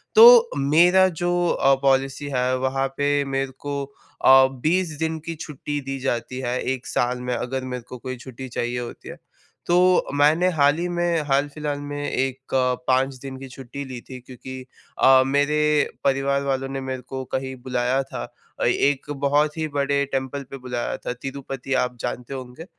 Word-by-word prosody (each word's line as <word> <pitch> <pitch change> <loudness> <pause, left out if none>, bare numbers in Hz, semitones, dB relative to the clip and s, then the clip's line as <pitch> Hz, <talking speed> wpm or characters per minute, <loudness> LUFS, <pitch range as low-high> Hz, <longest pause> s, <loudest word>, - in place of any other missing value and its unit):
तो, 470 +1 +9
मेरा 175 +7 +5 0.2
जो 175 0 +1
अ, 135 - +3
पॉलिसी 135 +1 +1
है 125 +1 +1
वहाँ 135 +1 0
पे 145 0 +2
मेरे 135 0 -2
को 140 -1 -2
अ, 135 -1 +4
20 155 +5 0
दिन 160 0 -1
की 165 -1 -4
छुट्टी 150 -1 -5
दी 135 0 -5
जाती 125 -1 -2
है 125 -1 -2
1 130 -1 -7
साल 125 +1 0
में 125 0 -2
अगर 130 +2 -3
मेरे 125 -2 -5
को 125 - -7
कोई 130 +1 -6
छुट्टी 130 +1 -9
चाहिए 120 0 -2
होती 120 -1 -8
है। - - -8 0.5
तो, 180 +1 +4
मैंने 150 +5 +4
हाल 145 -1 +3
ही 175 - -1
में 175 -2 0
हाल-फिलहाल 145 +1 -1
में 145 0 -4
एक 135 0 -3 0.3
5 130 +1 +2
दिन 135 -1 -7
की 135 - -8
छुट्टी 135 +2 -8
ली 130 -2 -7
थी 130 - -7
क्योंकि 130 +1 -9 0.4
अ, 130 0 +7
मेरे 145 +3 +2 0.4
परिवार 140 0 +1
वालों 135 -1 -1
ने 135 0 -4
मेरे 130 -1 -4
को 130 +1 -6
कहीं 130 0 -2
बुलाया 125 +1 0
था 135 - -6 0.4
अ, - - -1
एक 140 +1 +1 0.2
बहुत 150 +2 +2
ही 160 - -1
बड़े 140 0 +1
टेम्पल 135 +1 -2
पे 135 - -6
बुलाया 125 -2 -3
था, - - -4
तिरुपति 135 +1 -6
आप 125 -1 -4
जानते 125 +2 -4
होंगे। 130 +5 -8
135 Hz, 175 wpm, -23 LUFS, 130-145 Hz, 0.5 s, तो